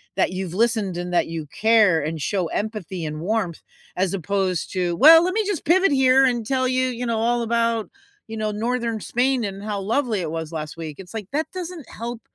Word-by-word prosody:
That - - +1
you've 185 -2 -4
listened 220 -3 +1
and 175 0 -4
that 175 - +2
you 165 -2 -5
care 215 -2 +3
and 155 +1 -4
show 180 +4 -1
empathy 200 -3 -4
and 155 0 -5
warmth, 190 -3 -1 0.4
as 185 0 0
opposed 190 -2 -1
to, 180 -2 0
"Well, 325 +5 +9
let 365 - -1
me 435 +1 0
just 395 -6 -3
pivot 370 +3 +4
here 265 -1 +5
and 240 -3 0
tell 260 +1 +1
you, 255 0 +1
you 245 0 -4
know, 230 -2 0
all 240 +1 +1
about, 230 -1 0 0.4
you 225 - -7
know, 215 -1 -1
northern 230 +1 -2
Spain 250 +2 0
and 195 0 -6
how 210 -1 -3
lovely 225 +1 0
it 160 -3 -4
was 160 -1 -4
last 155 -2 -5
week." 155 -3 -7
It's 190 +1 -11
like, 215 -4 -5
that 310 +2 0
doesn't 355 -6 -7
help 235 +1 -6
220 Hz, 215 wpm, -23 LUFS, 180-250 Hz, 0.4 s, Well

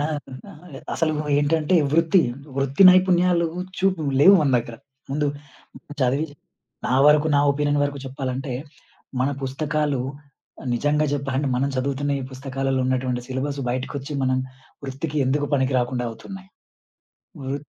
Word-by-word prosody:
న - - +1 0.9
అసలు 160 -2 +1 0.3
ఏంటంటే 155 +3 +1 0.2
వృత్తి, 165 +3 +4 0.4
వృత్తి 135 +5 +2
నైపుణ్యాలు 180 -2 +3 0.3
చూపు 185 -3 +1 0.2
లేవు 190 +7 +8
మన 145 -3 +2
దగ్గర. 115 0 -6 0.3
ముందు 145 +2 0 0.7
చదివి, 135 +4 +1 0.6
నా 125 - +1
వరకు 150 +1 +5
నా - - +4
ఒపీనియన్ 145 0 0
వరకు 145 0 -3
చెప్పాలంటే? 130 0 -4 0.7
మన 130 - +2
పుస్తకాలు 145 +1 -1 0.7
నిజంగా 150 +4 +1
చెప్పాలంటే, 140 0 -1
మనం 135 +2 +1
చదువుతున్న 140 +2 -1
ఈ - - -5
పుస్తకాలలో 135 0 -2
ఉన్నటువంటి 130 -1 -1
సిలబసు 140 +2 -3
బయటకొచ్చి. 130 +3 -4
మనం 130 0 +1 0.5
వృత్తికి 140 +3 -5
ఎందుకు 145 +2 +1
పనికి 130 -1 +1
రాకుండా 125 0 -1
అవుతున్నాయి. 190 +11 -10 0.9
వృ 135 0 -3
140 Hz, 120 wpm, -23 LUFS, 130-150 Hz, 0.9 s, లేవు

